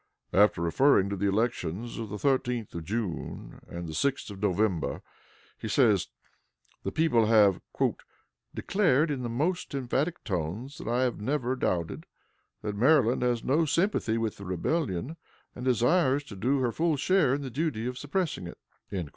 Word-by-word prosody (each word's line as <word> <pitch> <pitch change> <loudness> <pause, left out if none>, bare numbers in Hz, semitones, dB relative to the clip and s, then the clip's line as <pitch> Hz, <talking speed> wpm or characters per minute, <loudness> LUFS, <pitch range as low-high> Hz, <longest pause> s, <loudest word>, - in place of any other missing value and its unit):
After 100 -3 +4
referring 100 - +3
to - - -1
the 100 +1 0
elections 110 0 -1
of 110 -2 -5
the 105 - -5
13th 125 -2 0
of 85 - -5
June 100 -4 -4
and 85 0 -6
the 80 - -6
6th 135 - -1
of 100 -1 -10
November, 100 -3 0 0.6
he - - -5
says, 105 - +3 0.7
the - - -3
people 145 -9 +3
have 105 -4 +5 0.9
"declared, 165 -6 +2
in 135 -3 -2
the 120 - -3
most 155 +7 -1
emphatic 140 +6 -1
tones, 100 - -4
what 115 - -4
I 125 +2 +2
have 125 -4 -1
never 130 +1 0
doubted, 85 -9 -2 0.6
that 105 -1 -3
Maryland 125 +1 +4
has 120 -2 +1
no 155 +5 +2
sympathy 165 - +1
with 115 -2 -2
the 100 - -9
rebellion, 125 - -2 0.4
and 125 - -7
desires 130 +3 +3
to 110 - -10
do 130 +8 +1
her 120 -2 +1
full 160 +3 +1
share 155 -3 +3
in 145 - -4
the 130 - -5
duty 135 -4 -2
of 125 0 -4
suppressing 145 - -2
it." 85 - -10
120 Hz, 165 wpm, -28 LUFS, 100-140 Hz, 0.9 s, have